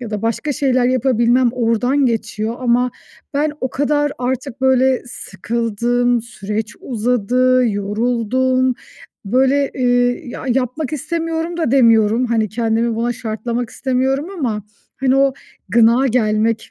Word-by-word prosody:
ya 235 -3 -6
da 210 -1 -4
başka 230 +6 -1
şeyler 255 -3 +1
yapabilmem 250 -1 +2
oradan 250 +3 +1
geçiyor 225 0 -2
ama 245 0 +2 0.4
ben 295 +1 +1
o 260 - -2
kadar 290 +1 0
artık 260 +1 -3
böyle 260 0 +3
sıkıldım, 235 +3 -1
süreç 210 -1 -5
uzadı, 250 +1 +1
yoruldum. 245 +5 0 0.5
Böyle, 265 +6 +2
eee, 245 -1 +1
ya, 240 - -7
yapmak 255 +4 -1
istemiyorum 330 +2 -3
da 320 -8 0
demiyorum, 230 -2 +4
hani, 225 -2 0
kendimi 230 +1 0
buna 235 +1 0
şartlamak 230 +1 -4
istemiyorum 265 +3 -1
ama 220 -7 -2 0.3
hani, 265 0 +1
o 275 0 +3 0.4
gına 235 +5 +4
gelmek 220 -2 0
245 Hz, 120 wpm, -18 LUFS, 230-260 Hz, 0.5 s, demiyorum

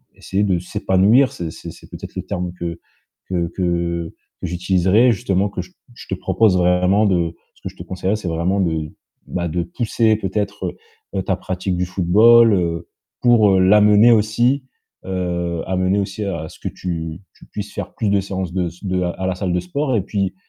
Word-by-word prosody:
essayer 100 +2 -2
de 95 -3 +2
s'épanouir. 95 +8 +3
C'est 85 -2 -5
c'est - - -9
c'est - - -16
peut-être - - -9
le - - -3
terme 90 0 -3
que 85 -1 -5 0.5
que 85 -2 0
que - - -7 0.8
que - - -3
j'utiliserai 95 +6 +3
justement 100 -3 0
que 95 - -4
j 90 0 -13 0.2
je - - -13
te 95 - -2
propose 95 +1 +2
vraiment 90 +4 +3
de 85 -4 +1 0.2
ce - - -27
que - - -5
je - - -17
te - - -9
conseillerais, 95 +2 -2
c'est 105 -4 -5
vraiment 90 +4 0
de, 80 -3 -1 0.4
bah, 85 -1 -2
de 85 +2 -1
pousser 110 +3 +1
peut-être, 100 -2 -3 0.4
heu, 95 - 0
ta 95 - 0
pratique 95 0 -3
du 90 - 0
football, 110 +6 +5
heu, 85 -2 -1 0.3
pour, 115 -4 +5
heu, 95 -1 +4
l'amener 105 +4 +6
aussi, 120 +5 +2 0.4
heu, 85 -2 -2
amener 95 +2 +1
aussi 100 +2 -3
à 85 -5 -3
ce - - -15
que - - -4
tu 80 -2 -4 0.2
tu - - -16
puisses 105 0 -7
faire - - -6
plus 110 -3 -1
de 100 -1 +2
séances 95 -2 -4
de 90 -2 0
s 85 +2 -11
de 90 -1 0
à 90 +1 -2
la 95 - -1
salle 95 -1 -2
de 90 - +1
sport 130 +10 -2
et - - +1
puis, 100 -1 -2
95 Hz, 195 wpm, -20 LUFS, 90-105 Hz, 0.8 s, l'amener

